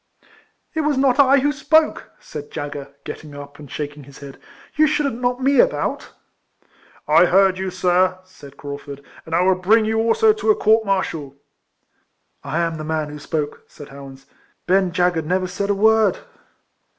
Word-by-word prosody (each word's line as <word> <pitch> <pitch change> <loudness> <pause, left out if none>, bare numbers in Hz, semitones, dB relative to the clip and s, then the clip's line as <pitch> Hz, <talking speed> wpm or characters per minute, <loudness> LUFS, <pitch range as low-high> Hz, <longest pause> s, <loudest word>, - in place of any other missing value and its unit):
" - - -35
It 320 - -1
was 295 -2 0
not 265 -1 +2
I 275 0 +5
who 290 +2 +2
spoke," 310 +2 +1
said 145 -1 -9
dagger, 145 -1 -7
getting 150 -2 -9
up, 145 0 -11
and 145 -2 -12
shaking 145 -1 -6
his 140 0 -15
head. 140 -2 -11 0.2
" - - -24
You 310 +1 +4
shouldn't 280 -5 -1
knock 245 0 0
me 275 +2 +2
about." - - 0 0.5
" - - -34 0.2
I 160 +4 +6
heard 190 +1 +3
you, 190 0 -2
sir," 185 0 +1
said 145 -7 -16
Craufurd; 140 0 -8
" - - -20
and 160 - -2
I - - +3
will 190 +1 +4
bring 210 +5 +2
you 220 +1 0
also 230 - +3
to 430 +1 -3
a 425 - +6
court 220 - +3
martial." 160 -8 -2 0.6
" - - -46 0.2
I 170 - -2
am 165 -1 -2
the 155 - -6
man 155 -1 -2
who 150 0 -9
spoke," 150 -1 -4
said 145 0 -13
Howans. 135 -1 -12 0.2
" - - -42
Ben 190 0 +2
dagger 175 -1 +1
never 185 +4 -1
said 195 +2 -4
a 205 - +2
word." 220 -1 +3
185 Hz, 195 wpm, -20 LUFS, 150-225 Hz, 0.6 s, I